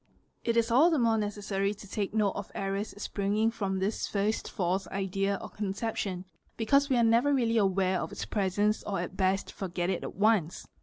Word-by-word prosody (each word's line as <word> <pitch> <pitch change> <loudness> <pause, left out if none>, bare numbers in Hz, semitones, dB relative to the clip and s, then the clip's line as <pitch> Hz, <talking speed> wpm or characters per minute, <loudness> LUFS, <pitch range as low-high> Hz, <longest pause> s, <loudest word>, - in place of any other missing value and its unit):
| - - -43
q - - -4
It 230 - +2
is 230 0 +2
all 285 +9 +6
the 325 - +2
more 230 -3 +3
necessary 205 -1 -1
to 205 - -12
take 200 0 -2
note 210 -2 +2
of 200 +1 -7
errors 195 +2 -3
springing 210 +2 0
from 195 -4 -2
thi 195 +3 +1
first 210 0 -1
false 190 0 -1
idea 195 +1 -1
or - - -7
conception, 200 -2 -3 0.3
because 275 +6 +3
we 260 - +3
are 235 - +4
never 230 +5 +4
really 235 -4 +2
aware 190 -2 +2
of - - -5
it - - -5
presence, 205 +1 +1
or 200 -3 -3
at 180 +1 -5
best 190 0 0
forget 180 -1 -2
it 185 - -2
at - - -6
once. 200 -5 +2
205 Hz, 205 wpm, -29 LUFS, 195-225 Hz, 0.3 s, all